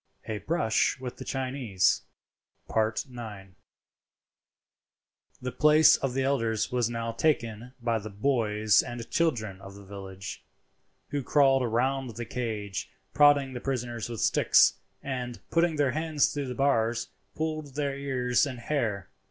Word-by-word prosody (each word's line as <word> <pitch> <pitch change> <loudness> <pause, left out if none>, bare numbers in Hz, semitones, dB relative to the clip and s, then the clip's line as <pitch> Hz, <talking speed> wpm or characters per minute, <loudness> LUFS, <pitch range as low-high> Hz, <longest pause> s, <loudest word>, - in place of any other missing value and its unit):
A 110 -1 -3
BRUSH 155 0 +1
WITH 125 -1 -6
THE - - -7
CHINESE.—IX. 110 -3 -3 1.9
The 125 0 -4
place 150 +1 +6
of 135 -2 -2
the 135 - +1
elders 115 -5 0
was 120 -2 +1
now 115 -1 -3
taken 120 -2 -1
by 115 -1 0
the 110 +1 -7
boys 105 -2 +2
and 120 -1 -7
children 110 - 0
of 100 0 -11
the 100 0 -12
village, 95 -1 -8 0.7
who 145 0 -2
crowded 135 -2 +3
round 130 +1 0
the 120 +1 -5
cage, 110 -6 -4 0.2
prodding 145 -2 +5
the 125 - -6
prisoners 120 -4 -3
with 115 -3 -5
sticks; - - +4 0.2
and, 125 -3 -4
putting 170 -1 +2
their 145 -3 +2
hands 155 0 +1
through 145 -2 -3
the 125 - -5
bars, 120 -4 +1 0.3
pulled 155 -3 -3
their 140 -2 -1
ears 130 -1 +1
and 130 -3 -6
hair. 115 -7 -2
125 Hz, 135 wpm, -28 LUFS, 110-140 Hz, 1.9 s, place